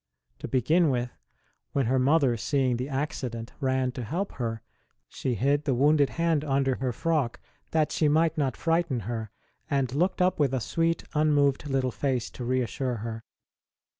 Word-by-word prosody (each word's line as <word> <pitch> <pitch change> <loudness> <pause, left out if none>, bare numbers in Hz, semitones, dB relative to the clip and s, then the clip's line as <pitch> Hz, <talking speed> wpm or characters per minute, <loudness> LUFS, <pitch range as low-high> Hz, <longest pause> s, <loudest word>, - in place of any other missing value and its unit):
To - - -5
begin 155 +6 +3
with, 125 -2 -1 0.6
when 135 -2 +1
her 130 +3 +2
mother, 135 -2 +3
seeing 130 +1 0
the 130 +3 -4
accident, 130 -4 -3
ran 130 -2 +1
to 125 0 -6
help 175 - -3
her, 115 -2 -3 0.4
she 125 -2 -3
hid 140 +7 +1
the 135 -4 +1
wounded 145 +2 +4
hand 165 -3 0
under 135 -2 +1
her 130 -1 -1
frock 145 -1 -1 0.3
that 155 -2 +1
she 155 - +2
might 160 +2 +3
not 140 -4 -1
frighten 165 -6 0
her, 110 +1 -4 0.4
and 135 -4 0
looked 180 +6 +1
up 180 -2 +2
with 135 -3 +2
a - - 0
sweet, 165 +7 0
unmoved 150 -2 +2
little 130 -2 +1
face 130 -2 -1
to 125 - -7
reassure 125 +1 -1
her. 115 -1 -5
135 Hz, 165 wpm, -27 LUFS, 125-155 Hz, 0.6 s, wounded